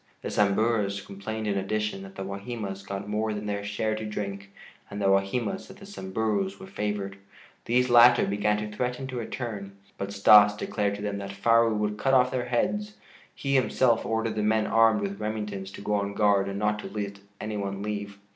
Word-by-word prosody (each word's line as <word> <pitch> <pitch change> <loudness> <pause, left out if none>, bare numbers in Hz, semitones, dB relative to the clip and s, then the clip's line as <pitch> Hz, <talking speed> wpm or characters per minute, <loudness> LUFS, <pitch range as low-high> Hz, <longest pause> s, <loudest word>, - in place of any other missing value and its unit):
The - - -3
Samburus 105 0 +2
complained 110 +3 -5
in 105 -1 0
addition 105 0 -2
that 95 0 -11
the 95 - -5
Wahimas 100 0 -5
got 100 0 -5
more 105 +1 -1
than 105 0 -5
their 100 -1 -2
share 105 +1 -1
to 110 0 -4
drink, 100 -2 -5 0.4
and 100 - -6
the 100 - -1
Wahimas 105 - 0
that 190 - -13
the 200 - -12
Samburus 110 - -2
were 190 - -9
favored. 105 - -3 0.5
These 125 +2 +2
latter 120 0 +7
began 105 +1 +1
to 105 0 -5
threaten 125 +3 -2
to 130 - -5
return, 110 -4 -5 0.2
but 100 0 -3
Stas 105 +1 +7
declared 100 -1 -1
to 105 - -7
them 100 -1 -2
that 100 0 -6
Faru 115 +2 +3
would 105 0 -1
cut 135 +3 +3
off 125 0 +4
their 125 -1 -1
heads. 205 - -1 0.4
He 140 -1 -2
himself 130 -2 +3
ordered 115 0 -1
the 105 - -1
men 110 +1 +2
armed 115 -2 +4
with 100 0 -3
Remingtons 105 -3 -4
to - - -9
go 105 +1 -2
on 100 0 -1
guard 100 -2 +3
and 100 - -4
not 105 0 0
let 100 -1 -4 0.2
any 105 0 -4
one 100 0 -3
leave. 105 -1 -4
105 Hz, 195 wpm, -27 LUFS, 100-115 Hz, 0.5 s, latter